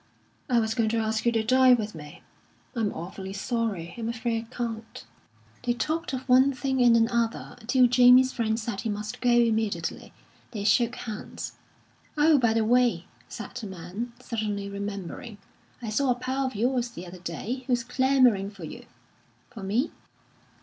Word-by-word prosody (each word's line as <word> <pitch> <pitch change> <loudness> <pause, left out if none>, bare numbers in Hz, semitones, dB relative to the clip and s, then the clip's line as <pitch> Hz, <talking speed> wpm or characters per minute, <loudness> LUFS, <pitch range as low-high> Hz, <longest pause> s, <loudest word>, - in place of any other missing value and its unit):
"I 245 -2 +4
was 220 -1 0
going 225 -1 +1
to 230 - 0
ask 220 +1 0
you - - +5
to 225 -1 +1
dine 255 +2 +6
with 215 -1 -4
me." 150 -2 -11 0.5
"I'm 220 -3 0
awfully 190 +3 -7
sorry! 200 -5 -2
I'm 225 0 -2
afraid 230 -1 -2
I - - -15
can't." 225 -2 -5 0.6
They 245 -1 0
talked 315 +6 -2
of 260 0 -5
one 260 +2 +5
thing 265 0 -1
and 240 -1 +6
another, 230 0 0
till 255 0 +5
Jamie's 250 +1 +6
friend 225 -2 0
said 220 -3 -4
he 225 - -3
must 210 +3 -5
go 245 - +2
immediately; 220 -7 +1 0.4
they 210 -3 -3
shook 235 +4 +3
hands. 215 -3 -6 0.6
"Oh, 300 0 +5
by 235 -3 +3
the 225 -1 +2
way," 240 -7 +3 0.2
said 215 - -8
the 245 -4 -6
man, 190 +6 -6
suddenly 210 -3 -3
remembering, 200 +2 -6 0.5
"I 220 - -3
saw 270 +5 +1
a 250 - +3
pal 260 +2 -2
of 255 - -6
yours 245 +2 0
the 185 -6 -9
other 180 +1 -10
day, 205 - -4
who's 245 -2 +1
clamouring 250 -5 +3
for 195 -4 -12
you." 155 - -9 0.6
"For 225 -4 -9
me?" 215 +10 0
230 Hz, 170 wpm, -27 LUFS, 210-250 Hz, 0.6 s, dine